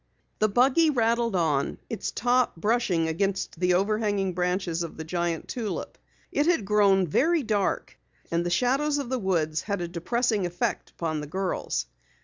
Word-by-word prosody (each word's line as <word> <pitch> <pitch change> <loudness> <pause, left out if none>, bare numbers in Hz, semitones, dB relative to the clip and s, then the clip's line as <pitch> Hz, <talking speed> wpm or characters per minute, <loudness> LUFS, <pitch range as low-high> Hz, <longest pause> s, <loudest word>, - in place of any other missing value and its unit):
The 215 - +3
buggy 265 +9 +4
rattled 235 -4 +1
on, 155 -6 +1
its 225 - -3
top 245 +2 +1
brushing 190 -3 +1
against 190 +1 -2
the 180 0 +3
overhanging 205 -1 0
branches 180 -1 -1
of 170 - -5
the 160 - -5
giant 170 0 -2
tulip. 225 -5 -4 0.4
It 295 - +1
had 335 - +2
grown 200 -2 +4
very 315 - +2
dark 210 -4 -1 0.3
and 170 +1 +1
the 175 - -1
shadows 270 +10 +1
of 280 -4 -3
the 260 -1 -1
woods 165 -6 0
had 200 -2 -3
a 175 - -3
depressing 205 +4 0
effect 175 0 -2
upon 155 -3 -3
the 150 - -6
girls. 185 - -2
195 Hz, 160 wpm, -26 LUFS, 175-235 Hz, 0.4 s, buggy